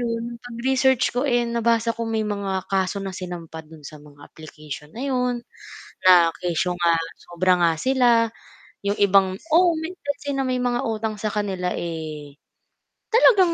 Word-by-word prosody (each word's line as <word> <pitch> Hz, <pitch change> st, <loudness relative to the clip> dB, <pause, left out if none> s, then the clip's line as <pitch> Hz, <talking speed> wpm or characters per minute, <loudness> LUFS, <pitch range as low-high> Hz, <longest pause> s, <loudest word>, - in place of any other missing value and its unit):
ngayon 235 Hz, 0 st, -3 dB
pag-research 255 Hz, +1 st, +1 dB
ko, 245 Hz, -, +1 dB
eh, 240 Hz, -1 st, +2 dB
nabasa 230 Hz, 0 st, +1 dB
ko 230 Hz, 0 st, -4 dB
may 220 Hz, -1 st, 0 dB
mga 195 Hz, -2 st, -2 dB
kaso 190 Hz, 0 st, 0 dB
na 195 Hz, -1 st, -5 dB
sinampa 175 Hz, -3 st, -7 dB
do'n 155 Hz, -1 st, -15 dB
sa 150 Hz, 0 st, -11 dB
mga 145 Hz, -1 st, -17 dB
application 150 Hz, -2 st, -10 dB
na 245 Hz, +4 st, -5 dB
'yon, 250 Hz, -2 st, -1 dB, 0.7 s
na 175 Hz, -2 st, +7 dB
kesyo 180 Hz, +1 st, -1 dB
nga 170 Hz, -1 st, +3 dB, 0.3 s
sobra 180 Hz, +1 st, +1 dB
nga 170 Hz, -1 st, +4 dB
sila 245 Hz, -3 st, +3 dB, 0.6 s
'yong 200 Hz, -, +1 dB
ibang 195 Hz, -1 st, +4 dB, 0.2 s
oo 350 Hz, +1 st, +6 dB, 0.3 s
kasi 285 Hz, 0 st, -3 dB
may 255 Hz, -2 st, 0 dB
mga 245 Hz, -1 st, 0 dB
utang 220 Hz, -1 st, -2 dB
sa -, -, -3 dB
kanila, 190 Hz, -4 st, -2 dB
eh, 155 Hz, -4 st, -6 dB, 0.8 s
talagang 400 Hz, -7 st, +6 dB
215 Hz, 150 wpm, -23 LUFS, 175-245 Hz, 0.8 s, na